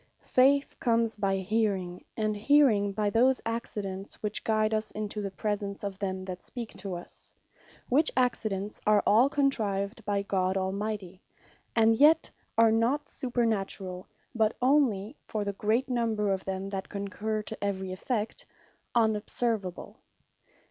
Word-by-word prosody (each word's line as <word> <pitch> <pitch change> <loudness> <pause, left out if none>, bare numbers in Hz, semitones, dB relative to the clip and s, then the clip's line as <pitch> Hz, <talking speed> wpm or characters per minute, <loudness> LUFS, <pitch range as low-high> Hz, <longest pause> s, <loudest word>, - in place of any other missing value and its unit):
Faith 275 +2 +4
comes 230 -2 +1
by 195 -2 0
hearing, 190 -3 -1
and 215 -1 0
hearing 215 -3 +4
by 210 +1 -1
those 255 +4 +4
accidents, 205 -4 -3
which 210 -1 -1
guide 215 0 +1
us 215 0 0
into 210 0 -3
the 200 - -3
presence 200 0 -3
of 200 -1 -4
them 190 -2 -3
that 185 -1 -7
speak 235 -3 -6
to 190 -1 -3
us; 175 - -6 0.5
which 295 +5 +4
accidents 215 -5 0
are 210 -1 +5
all 235 +6 +5
contrived 225 -7 0
by 200 -1 0
God 190 -1 0
Almighty; 190 -1 -3 0.5
and 225 0 +5
yet 310 +4 +5 0.3
are 225 -1 +6
not 240 +7 +1
supernaturall, 205 -8 -2 0.3
but 220 -2 +2
onely, 250 -4 +2
for 215 -1 -2
the 200 0 -2
great 220 +6 0
number 225 -5 0
of 190 -1 -2
them 190 0 -3
that 195 -1 -5
concurre 210 +2 -3
to - - -6
every 190 -2 -2
effect, 215 +3 -3 0.5
unobservable. 220 -3 0
210 Hz, 140 wpm, -29 LUFS, 195-230 Hz, 0.5 s, are